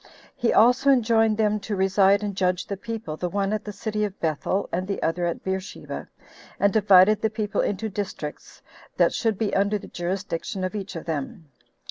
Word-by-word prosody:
He 240 - +1
also 250 +5 +5
enjoined 225 -4 +3
them 215 -1 +2
to 205 +1 -4
reside 195 +1 +3
and 205 -2 -3
judge 185 -1 0
the 200 - -4
people, 225 -6 -6
the 180 - -2
one 200 +2 -1
at 215 - -2
the 210 - -5
city 210 +1 -3
of 205 -2 -4
Bethel, 165 +5 -1
and 185 +2 -2
the 200 - -2
other 175 +2 0
at 170 - -4
Beersheba, 190 +1 -5 0.5
and 200 -1 +3
divided 205 0 +6
the 220 - +2
people 215 -2 -1
into 205 +2 -2
districts 195 -7 -6 0.3
that - - +4
should 225 -4 0
be 215 -1 -1
under 200 +2 +2
the - - -11
jurisdiction 185 +1 -4
of 185 - -2
each 200 -2 -5
of 165 - -6
them. 160 +1 -5
200 Hz, 190 wpm, -25 LUFS, 185-215 Hz, 0.5 s, divided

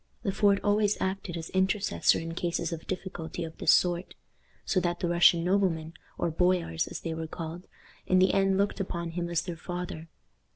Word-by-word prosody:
Le 200 - 0
Fort 200 0 +3
always 205 0 +2
acted 190 -2 -3
as 165 0 -7
intercessor 190 +2 +2
in 165 0 -5
cases 170 0 -2
of 160 - -8
difficulty 175 -3 -5
of 160 -1 -7
this - - +5
sort; 175 0 +2 0.5
so 190 - +2
that 175 -1 -1
the 175 - -1
Russian 170 0 +5
noblemen, 175 -4 +1 0.2
or 170 - 0
boyars 175 -1 +1
as - - -6
they 165 - -3
were 160 0 -4
called, 165 +2 -7 0.4
in 185 - +4
the 185 +1 +4
end 195 -1 +3
looked 200 +1 0
upon 170 -3 -3
him 170 0 -3
as 170 -1 0
their 175 -2 -5
father. 175 -2 -6
175 Hz, 190 wpm, -28 LUFS, 165-190 Hz, 0.5 s, this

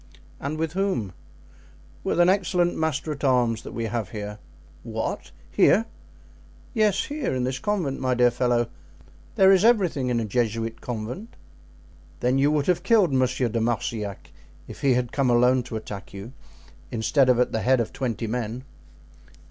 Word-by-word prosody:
"And 145 +3 -4
with 160 0 -2
whom?" 185 - -1 0.9
"With - - -1
an 175 - +6
excellent 180 -2 +2
master 160 -1 -1
at 150 - -7
arms 120 -4 +2
that - - -9
we 115 - -4
have 115 -1 -3
here." 105 -1 -6 0.4
"What! - - -4 0.2
here?" 220 +4 +4 0.9
"Yes, 215 -5 +2
here, 290 - -3
in 125 - -1
this 130 +1 -2
convent, 175 -8 -1
my 130 -1 0
dear 125 0 +4
fellow. 120 -1 0 0.6
There 190 0 +6
is 190 0 +5
everything 185 - +3
in 120 -1 +1
a 115 - -2
Jesuit 115 0 -2
convent." 125 - -6 0.8
"Then 125 +2 +1
you 140 +2 +4
would 150 -2 +1
have 180 -2 +1
killed 205 - +3
Monsieur 130 -1 +1
de 115 0 -2
Marsillac 110 -3 -3 0.4
if - - -10
he 135 -3 +3
had 125 -1 -1
come 135 -3 +1
alone 125 +2 +4
to 120 -2 -8
attack 105 -3 -7
you, 100 +6 -8 0.6
instead 125 +4 +2
of 125 -1 +4
at 125 - +2
the 110 - -1
head 130 +4 +3
of 115 - -2
twenty 120 -3 -3
men?" 120 +2 -3
125 Hz, 165 wpm, -25 LUFS, 115-160 Hz, 0.9 s, an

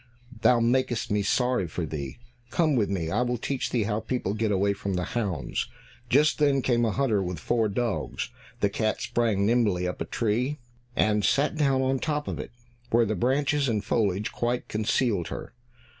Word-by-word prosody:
Thou 120 +2 +5
makest 120 -1 +1
me 105 0 +2
sorry 125 -1 +1
for 85 +1 -3
thee; 70 -3 -5 0.3
come 155 -1 +2
with 110 -5 +2
me, 85 -5 -2
I - - +1
will 125 0 0
teach 130 +3 -2
thee 120 -3 +1
how 105 +1 -1
people 110 -3 -2
get 110 0 0
away 100 +1 +2
from 100 -1 -3
the 90 - 0
hounds." 90 - -2 0.4
Just 150 +5 +4
then 140 -3 +3
came 120 -2 +2
a - - +2
hunter 115 -4 +1
with 90 -2 -3
four 110 +7 +1
dogs. 100 - -2 0.3
The 100 - +3
cat 110 +1 0
sprang 110 -4 +1
nimbly 105 -6 +2
up 90 - -5
a - - 0
tree, 120 +6 0 0.4
and 105 -1 +2
sat 140 - +2
down 135 -3 +2
on 130 0 +1
top 150 0 -2
of - - -3
it, - - -5 0.4
where 115 0 +4
the 110 - -1
branches 135 +6 +1
and 105 -3 -1
foliage 105 -2 0
quite 120 +1 -1
concealed 105 -3 0
her. - - -7
115 Hz, 190 wpm, -27 LUFS, 100-125 Hz, 0.4 s, Thou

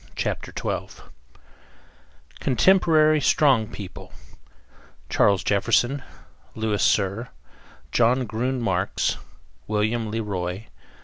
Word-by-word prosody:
CHAPTER - - -3
TWELVE - - -5 1.3
CONTEMPORARY 155 0 +4
STRONG 135 -6 +3
PEOPLE: 95 -3 -9 1.0
CHARLES 100 -3 +3
JEFFERSON; 120 +8 +1 0.5
LOUIS 110 -2 -1
CYR; 100 +4 +1 0.6
JOHN 125 +2 +3
GRUN 125 +4 -2
MARX; 95 -4 0 0.5
WILLIAM 110 +2 0
LE 110 +2 -3
ROY. 95 -1 -4
110 Hz, 80 wpm, -24 LUFS, 100-130 Hz, 1.3 s, CONTEMPORARY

